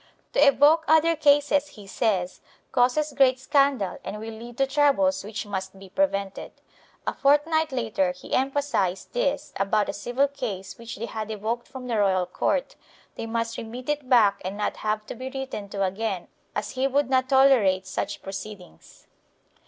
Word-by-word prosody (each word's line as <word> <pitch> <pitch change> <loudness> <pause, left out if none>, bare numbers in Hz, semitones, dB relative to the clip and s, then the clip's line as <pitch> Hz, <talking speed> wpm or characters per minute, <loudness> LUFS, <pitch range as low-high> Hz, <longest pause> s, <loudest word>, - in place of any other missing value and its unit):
To - - +1
evoke 290 +3 +6
other 320 +2 +4
cases, 290 -1 +3
he 205 - -11
says, 195 -4 -1 0.3
causes 275 +4 +2
great 260 -2 +4
scandal 275 -5 +1
and 210 - -5
will 225 +1 -6
lead 235 +2 -10
to 270 - +3
troubles 270 -10 +2
which 210 +1 -5
must 190 -1 -5
be 190 0 -13
prevented. 200 -6 -1 0.5
A - - -1
fortnight 305 +3 +2
later 220 -7 0
he 180 - -10
emphasized 265 -9 0
this - - -1
about 205 +2 +1
a - - -2
civil 245 +6 0
case 225 -10 -6
which 235 0 -7
they 225 - -4
had 220 -2 -5
evoked 220 +3 -3
from 260 -1 -9
the 235 -3 -1
royal 190 -3 +2
court; - - -1 0.4
they 225 - -6
must 230 0 -2
remit 245 +4 -7
it 295 -3 -2
back 215 -6 +4
and 190 +2 -4
not 210 - -2
have 215 0 -2
to - - -6
be 255 +2 -6
written 265 -7 -6
to 195 0 -2
again 195 -1 -2 0.3
as 210 - -3
he 260 +1 0
would 280 +1 +1
not 260 -1 +1
tolerate 250 -9 +4
such 195 +2 -4
proceedings. 195 - -9
235 Hz, 170 wpm, -25 LUFS, 200-275 Hz, 0.5 s, evoke